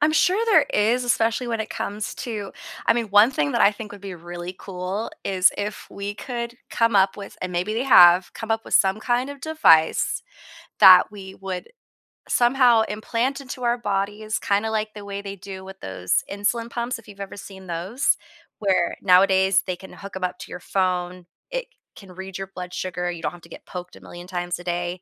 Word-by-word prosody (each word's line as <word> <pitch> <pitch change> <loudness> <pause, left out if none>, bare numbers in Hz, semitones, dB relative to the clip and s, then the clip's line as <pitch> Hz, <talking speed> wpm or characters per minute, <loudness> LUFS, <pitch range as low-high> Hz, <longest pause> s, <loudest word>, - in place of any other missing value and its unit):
I'm 300 +1 +3
sure 380 +7 +3
there 445 -4 +5
is, 225 +4 +2
especially 230 0 +1
when 230 -1 -1
it 220 - -4
comes 205 +1 -4
to 210 -5 -5 0.3
I - - +6
mean, 230 -1 -1
one 205 +4 +6
thing 145 - -1
that - - 0
I 200 - +6
think 210 0 -9
would 205 - -11
be 195 -2 -7
really 175 +1 -7
cool, 190 +3 -4
is 185 -2 +4
if 205 0 -4
we 200 +1 -5
could 235 0 -5 0.2
come 230 -2 +2
up 195 0 +4
with- 200 -1 -9
and 185 - -3
maybe 180 +4 -1
they 235 - 0
have- 180 -8 +7
come 225 -1 -7
up 225 0 0
with - - -3
some 195 +2 +3
kind 245 +4 0
of 285 -1 -9
device 290 - +3 0.6
that 185 -1 +9
we 190 -2 -10
would 190 - -6 0.6
somehow 245 -2 +4
implant 235 +6 -2
into 255 -1 -8
our 240 0 +2
bodies, 210 0 -2
kinda 205 +2 0
like 215 0 -2
the 210 -1 -9
way 200 0 -5
they 200 0 -7
do 190 0 -9
with 190 0 -11
those 95 -1 -1
insulin 230 +4 -1
pumps 240 +1 -3
if 230 - -18
you've 200 -1 -13
ever 195 - -7
seen 190 -1 -11
those, 180 - 0 0.4
where 190 -4 +1
nowadays 190 +1 +4
they 185 - -3
can 190 +1 -13
hook 200 0 -10
'em 190 - -5
up 180 - -2
to - - -10
your 180 - -6
phone. 180 -1 -1 0.3
It - - -3 0.3
can 195 -3 -13
read 190 0 -7
your 195 0 -5
blood 180 -2 -8
sugar. 180 -1 -3
You 170 -2 -8
don't - - 0
have 175 -1 -13
to 170 - -16
get - - -12
poked 180 0 -8
a - - -15
million 175 +1 -11
times 175 -1 -3
a 175 - -10
day. 175 +1 -3
200 Hz, 210 wpm, -23 LUFS, 185-230 Hz, 0.6 s, that